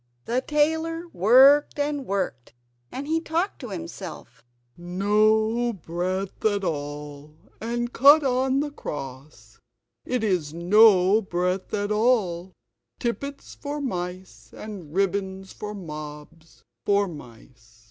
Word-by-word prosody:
The 245 +2 0
tailor 320 +4 0
worked 265 +11 +6
and 290 -2 -2
worked, 180 -12 -3 0.4
and 275 +2 -6
he 320 +1 +1
talked 335 +5 -2
to 250 - -7
himself: 85 - -8 0.3
"No 215 +6 +1
breadth 185 +2 -4
at 205 -2 +1
all, 145 -2 -5 0.3
and 240 +2 -3
cut 290 +4 +7
on 260 +1 +1
the 295 0 -3
cross; 135 - -8 0.4
it 250 -3 -2
is 175 -7 0
no 195 +2 +5
breadth 180 -1 -2
at 205 0 -2
all; 210 -6 +1 0.5
tippets 280 +4 -4
for 290 +1 -5
mice 180 - -5
and 195 -8 -8
ribbons 190 +1 -2
for 210 0 -6
mobs! 155 -2 -10 0.2
for 200 0 +2
mice!" 120 -6 -13
200 Hz, 115 wpm, -25 LUFS, 165-250 Hz, 0.5 s, cut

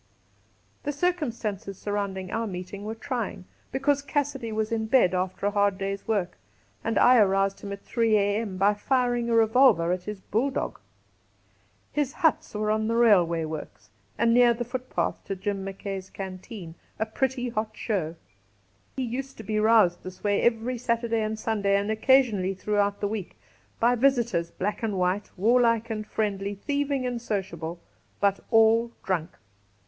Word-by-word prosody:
The 290 - -2
circumstances 235 - -2
surrounding 200 -3 -3
our 225 0 -1
meeting 185 +2 -6
were 220 +1 -4
trying, 225 -6 -4 0.3
because 275 +2 +1
Cassidy 280 -5 -2
was 220 0 -1
in 220 -1 -1
bed 220 -7 +4
after 185 +1 -2
a 205 - +2
hard 200 -1 +2
day's 195 0 -4
work, 200 -5 -1 0.4
and 225 -1 -1
I 250 +1 +6
aroused 195 -2 +3
him 200 - -6
at 200 0 -7
3 230 -2 +2
a.m. 205 -1 0
by 200 +2 +4
firing 245 +1 0
a 230 - +2
revolver 225 -6 +5
at 180 0 -2
his 210 -1 -5
bulldog. 255 +8 -2 1.1
His 290 -3 -1
huts 315 - +1
were 210 0 0
on 215 0 0
the 230 - 0
railway 180 -8 +4
works, 155 -1 -8 0.3
and 230 0 +3
near 240 -1 +5
the 240 - -3
footpath 250 +1 -3
to 195 - -3
Jim 195 +1 -3
Mackay's 195 -1 -6
canteen 190 -2 -8
— - - -36
a 220 - 0
pretty 250 +2 -1
hot 220 -1 -3
show. 175 -7 -2 0.8
He 265 - -2
used 260 +3 -4
to 220 - -8
be 215 0 -1
roused 215 -5 +4
this 185 0 -10
way 205 -1 +2
every 235 +1 +1
Saturday 230 -1 0
and 215 0 -2
Sunday, 205 -3 +1
and 200 +2 -1
occasionally 220 -5 +3
throughout 205 +1 0
the 205 - +1
week, 205 -3 -5 0.4
by 240 +2 +4
visitors, 235 -9 +2
black 200 +4 -3
and 215 -4 -1
white, 185 +3 0
warlike 230 +2 +3
and 215 -1 -4
friendly, 200 -2 -2
thieving 280 +3 -1
and 245 -1 -2
sociable, 170 -6 -4 0.4
but^all 225 +3 +3
drunk. 180 -3 -1
215 Hz, 160 wpm, -26 LUFS, 195-240 Hz, 1.1 s, I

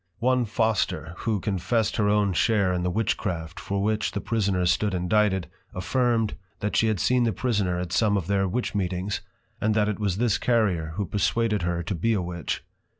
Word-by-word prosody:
One 125 0 +2
Foster, 110 -7 0
who 110 -3 -1
confessed 100 +3 0
her 105 -1 +2
own 105 -2 +2
share 100 -3 +2
in 90 - -1
the 90 - 0
Witchcraft 90 -5 -2
for 100 0 -2
which 110 +1 0
the 100 - -1
Prisoner 100 -5 0
stood 100 +2 +1
indicted, 95 +1 +2 0.3
affirm'd, 115 +3 +1 0.3
that 105 - -2
she 115 - +3
had 110 -4 0
seen 125 +5 +3
the 115 - +2
prisoner 100 -8 0
at 90 -1 -4
some 105 -2 +3
of 95 - -2
their 95 +1 +1
Witch 120 +7 -2
meetings, 95 0 -2 0.4
and 105 +1 +2
that 105 -1 +3
it 105 -1 -2
was 100 -3 0
this 115 -2 +1
Carrier, 95 -10 +1
who 100 - -1
perswaded 105 +1 0
her 85 0 -1
to 85 - -3
be 115 +7 +1
a 100 - +1
Witch. 85 -2 -4
100 Hz, 195 wpm, -26 LUFS, 90-110 Hz, 0.4 s, she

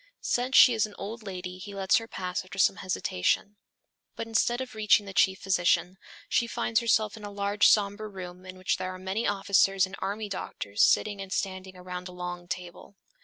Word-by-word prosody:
Since 250 +2 +1
she 250 - +9
is 220 -1 +1
an 210 - -15
old 225 +4 -6
lady 185 -3 -7
he 200 +2 -8
lets 190 -1 +3
her 225 - -4
pass 180 -4 -4
after 185 +1 -11
some 195 - +3
hesitation. 185 - -1 0.6
But - - -4
instead 225 +2 +1
of 260 -1 -5
reaching 215 -1 +3
the 195 - -8
chief 190 0 +3
physician, 180 -1 +1 0.3
she 235 - +1
finds 230 0 0
herself 220 -3 +1
in 215 - -12
a 205 - -5
large 200 +1 +2
somber 210 +1 +2
room 180 -2 -9
in 185 0 -10
which 185 - 0
there 185 0 -4
are 185 - -7
many 190 +5 -2
officers 195 -1 +3
and 190 +1 -9
army 205 +3 -3
doctors 105 - -4
sitting 205 -2 +3
and 190 -1 -8
standing 185 -1 -3
around 180 0 -7
a 180 - -10
long 175 0 -6
table. 180 +3 -7
195 Hz, 200 wpm, -28 LUFS, 185-210 Hz, 0.6 s, she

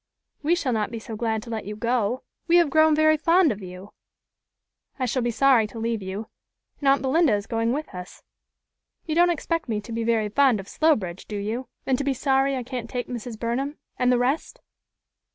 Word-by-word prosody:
"We 315 +4 +2
shall 280 -8 -1
not 215 -2 0
be 230 - -6
so 225 0 -7
glad 220 -1 -1
to 235 - -9
let 220 -3 -4
you 210 +1 -5
go. 235 +1 0 0.2
We 340 - +4
have 340 -5 +4
grown 315 0 +5
very 310 0 +4
fond 335 +1 +4
of 205 - -5
you." 185 +2 -10 1.0
"I 260 - -1
shall 250 +1 0
be 240 - 0
sorry 240 -2 +4
to 230 - -11
leave 225 -1 -2
you, 190 +3 -5 0.5
and 280 - -2
aunt 275 0 +4
Belinda 275 -2 +3
is 205 -1 -3
going 230 0 0
with 300 +4 -4
us. 180 0 -9 0.8
You 315 - -2
don't 350 +2 +5
expect 330 -3 -2
me 215 -2 0
to 220 - -11
be 230 0 -2
very 225 -2 +1
fond 255 -1 +3
of 195 - -8
Slowbridge, 205 - 0
do 210 - -4
you, 220 +6 -3 0.2
and 260 -2 +1
to - - -1
be 275 -1 0
sorry 270 +1 +2
I 255 - -3
can't 245 -2 -6
take 245 -1 -4
Mrs. 240 -2 -6
Burnham 260 +6 -2 0.2
and 250 0 +3
the 250 - +4
rest?" 255 +6 -1
245 Hz, 215 wpm, -24 LUFS, 220-280 Hz, 1.0 s, grown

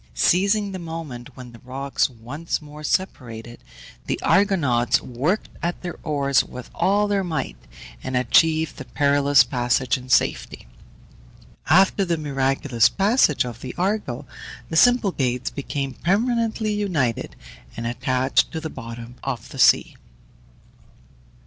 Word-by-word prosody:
Seizing 200 +3 +2
the 190 - -5
moment 150 -7 -7
when 125 -2 -10
the 115 - -14
rocks 135 +3 -1
once 130 +7 -5
more 150 0 -12
separated, 120 -10 -3 0.4
the - - -1
Argonauts 140 - +3
worked 145 - -2
at 175 +2 -3
their 175 - -5
oars 140 -4 +1
with 125 -1 -10
all 205 +2 +2
their 200 -1 0
might, 155 - -3 0.5
and 130 - -2
achieved 155 +5 +3
the 130 - -8
perilous 145 0 +4
passage 125 -1 0
in 130 0 -13
safety. 125 - +1 1.0
After 190 +4 +5
the 170 -3 0
miraculous 135 -4 +1
passage 200 - +2
of 120 -1 -8
the 130 - -7
Argo, 185 - -2 0.5
the - - -2
Symplegades 160 - +2
became 140 -1 -4
permanently 220 +2 0
united, 165 - -1 0.4
and 115 - -4
attached 125 +2 +1
to 160 - -2
the 160 0 -6
bottom 115 +1 -9
of 130 -5 -4
the - - -9
sea. - - +4
140 Hz, 130 wpm, -23 LUFS, 125-185 Hz, 1.0 s, After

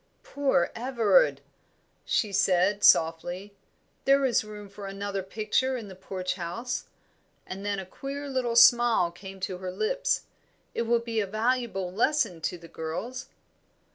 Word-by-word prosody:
"Poor 275 -11 +1
Everard!" 250 - +2 0.6
she 210 -3 0
said, 195 +1 +2
softly. 175 +5 +3 0.5
"There 275 0 +4
is 240 -4 +2
room 210 -1 -9
for 200 0 -9
another 195 0 -3
picture 220 +7 -1
in 220 -4 -8
the 190 - -10
Porch 185 -1 -4
House." 195 +8 -4 0.6
And 195 +1 -7
then 205 0 -1
a 190 - -5
queer 275 +8 -6
little 255 -3 -1
smile 235 -6 +6
came 190 +2 -11
to 185 -1 -3
her 185 -1 -4
lips. - - 0 0.5
"It 230 - -2
will 235 0 +3
be 230 -1 -2
a 205 - 0
valuable 215 -3 -1
lesson 225 - +1
to 180 - -2
the 170 -1 -13
girls." 170 - -5
205 Hz, 145 wpm, -27 LUFS, 185-245 Hz, 0.6 s, smile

